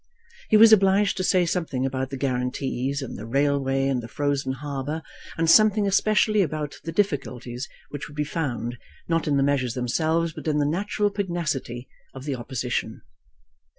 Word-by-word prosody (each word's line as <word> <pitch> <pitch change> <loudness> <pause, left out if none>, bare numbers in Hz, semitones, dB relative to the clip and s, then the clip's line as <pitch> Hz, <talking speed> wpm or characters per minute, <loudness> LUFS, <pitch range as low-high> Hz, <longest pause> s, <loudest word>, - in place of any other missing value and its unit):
He 215 - +6
was 220 0 +8
obliged 195 0 +4
to 185 - -1
say 180 -1 +3
something 165 -7 -1
about 130 0 -2
the 135 - -5
guarantees, 130 +1 -2
and 130 - -7
the 105 - -7
railway, 135 +1 +1
and 130 -3 0
the 115 - -8
frozen 140 0 -1
harbour, 145 +3 -4 0.3
and 165 0 +1
something 215 +3 +6
especially 215 +1 +3
about 155 -4 -3
the 165 - -4
difficulties 135 - -2 0.2
which 145 - -6
would 145 - -13
be 150 - +1
found, 125 -6 -3 0.3
not 165 -1 0
in 145 -2 +2
the 135 - +3
measures 135 -4 0
themselves, 160 +6 0
but - - -8
in 150 -1 +1
the 145 - +2
natural 205 +6 0
pugnacity 165 - -3 0.3
of 135 0 -8
the 145 - -1
Opposition. 120 -2 -3
145 Hz, 170 wpm, -25 LUFS, 130-170 Hz, 0.3 s, was